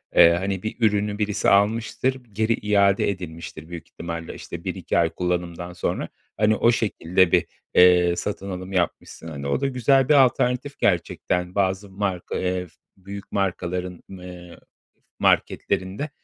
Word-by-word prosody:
eee, 85 - +9
hani, 95 0 -3
bir 110 - -3
ürünü 105 -2 +1
birisi 105 -1 +1
almıştır 115 +5 +1
geri 110 +2 +1
iade 100 -2 +2
edilmiştir. 85 -3 -7
Büyük 85 -2 -8
ihtimalle 85 -1 -6
işte - - -8
1-2 - - -2
ay 85 -1 +3
kullanımdan 90 0 -3
sonra. - - -3 0.3
Hani, 110 +1 +3
o 115 - +4
şekilde 95 -5 +1
bir, - - +4 0.3
eee, 90 -1 +6
satın 100 +1 -4
alım 95 +1 -6
yapmışsın. 85 -2 -2
Hani, 70 -3 -6
o 70 - 0
da 140 - +1
güzel 135 +1 +2
bir - - +6
alternatif 130 0 +2
gerçekten. 90 0 0
Bazı 95 0 0
marka, 95 -2 -3
eee, 90 0 -1
f 85 - -19 0.3
büyük 100 +1 -9
markaların, 90 -2 -2
eee, 90 -2 -10 0.6
marketlerinde, 100 +11 0
95 Hz, 145 wpm, -23 LUFS, 90-105 Hz, 0.6 s, eee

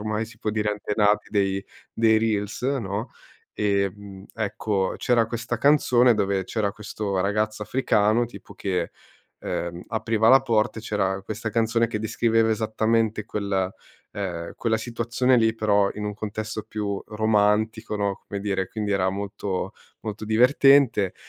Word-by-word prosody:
ormai 110 +1 -2
si 110 0 -15
può 105 - -2
dire, 105 0 0
antenati 105 0 +1
dei 95 -1 0 0.3
dei 110 -1 +4
reels, 110 0 -1
no, 115 -4 -2 0.5
ehm, 100 -1 -2
ecco, 105 -2 -1
c'era 120 -3 +2
questa 115 +1 -3
canzone 125 -4 +4
dove 100 -2 0
c'era 100 +1 -1
questo 105 -2 -3
ragazzo 105 +2 0
africano, 110 -1 +2
tipo, 120 - -12
che, 90 -4 -2 0.5
ehm, 85 +1 -4
apriva 110 0 +1
la 135 +2 +8
porta 115 -3 +1
e - - -8
c'era 95 -3 -1
questa 110 +2 -4
canzone 115 +1 +2
che 110 -2 -3
descriveva 115 +1 +2
esattamente 110 0 0
quel, 100 -3 -2 0.4
ehm, 85 -4 -5
quella 115 -1 +1
situazione 120 +2 +1
lì, 110 -1 +3
però 105 -2 +2
in 105 - -5
un 105 0 -3
contesto 110 +1 -5
più 100 -2 -3
romantico, 110 0 +1
no, 100 -2 -2
come 100 - -5
dire, 95 -2 -1
quindi 105 -2 -3
era 95 -2 +2
molto 100 -1 -4 0.3
molto 110 -1 -6
divertente, 125 -2 +4
105 Hz, 145 wpm, -24 LUFS, 100-115 Hz, 0.5 s, la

